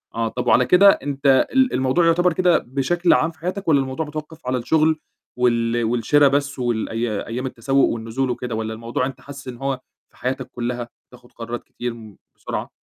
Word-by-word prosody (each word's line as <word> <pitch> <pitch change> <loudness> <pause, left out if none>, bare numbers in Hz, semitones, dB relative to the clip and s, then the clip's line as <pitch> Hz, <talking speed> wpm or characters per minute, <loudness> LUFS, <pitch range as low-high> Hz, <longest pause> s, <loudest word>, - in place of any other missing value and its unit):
آه، 115 0 0
طب 125 +2 -4
وعلى 125 - +5
كده 195 +6 +7
أنت 140 -4 +2
ال 260 -1 +3
الموضوع 130 +6 +2
يُعتبر 175 +1 +3
كده 180 0 +3
بشكل 155 +8 +1
عام 165 - +2
في 160 - -25
حياتك، 185 +4 -4
والّا 150 -4 +5
الموضوع 135 +4 -3
متوقف 155 0 -8
على 130 0 +1
الشُّغل 155 +5 +2 0.4
وال 120 -1 +1
والشرا 120 +6 +3
بس 140 0 0
والأيا 115 -2 -2
أيام 125 +3 -4
التسوق 135 +2 +1
والنزول 115 +3 -2
وكده، 125 -1 -3
والّا 110 0 -3
الموضوع 115 +3 -2
أنت 135 0 -7
حاسِس 140 -1 -10
إن 125 -1 -6
هو 135 0 -2 0.3
في - - -26
حياتك 130 0 -3
كُلّها، 120 0 -4 0.2
بتاخد 125 -1 -18
قرارات 120 +1 -6
كتير 120 -1 -5
م 110 -3 -13 0.2
بسرعة؟ - - -5
130 Hz, 185 wpm, -21 LUFS, 120-150 Hz, 0.4 s, كده